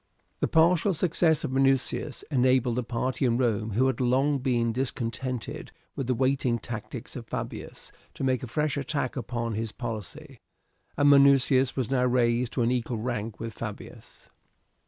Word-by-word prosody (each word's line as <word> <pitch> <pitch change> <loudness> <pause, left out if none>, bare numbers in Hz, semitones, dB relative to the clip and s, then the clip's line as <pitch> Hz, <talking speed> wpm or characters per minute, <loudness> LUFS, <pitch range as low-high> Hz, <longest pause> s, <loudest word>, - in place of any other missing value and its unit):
The - - +1
partial 170 +3 +3
success 160 -2 +2
of - - -2
Minucius 135 +1 +1
enabled 130 -2 +2
the 125 - 0
party 125 +3 -2
in 120 -2 +2
Rome 110 -4 0
who 125 +6 +3
had 130 -2 0
long 135 +3 +2
been 120 -3 0
discontented 125 -1 -3 0.2
with 135 - -3
the 130 - +1
waiting 130 -1 +1
tactics 115 -1 -7
of - - -7
Fabius - - -6 0.2
to - - -5
make 130 -2 +1
a 125 - -6
fresh 150 +3 -1
attack 140 -2 -2
upon 115 -2 -3
his 110 0 -3
policy, 120 +4 -7 0.6
and 145 - +4
Minucius 135 -2 +5
was 130 -2 -2
now 130 -2 +2
raised 120 -1 +1
to 125 - +1
an 115 - +2
equal 120 -1 -1
rank 110 -2 -4
with 115 -1 -5
Fabius. 105 -1 -9
125 Hz, 160 wpm, -27 LUFS, 115-135 Hz, 0.6 s, Minucius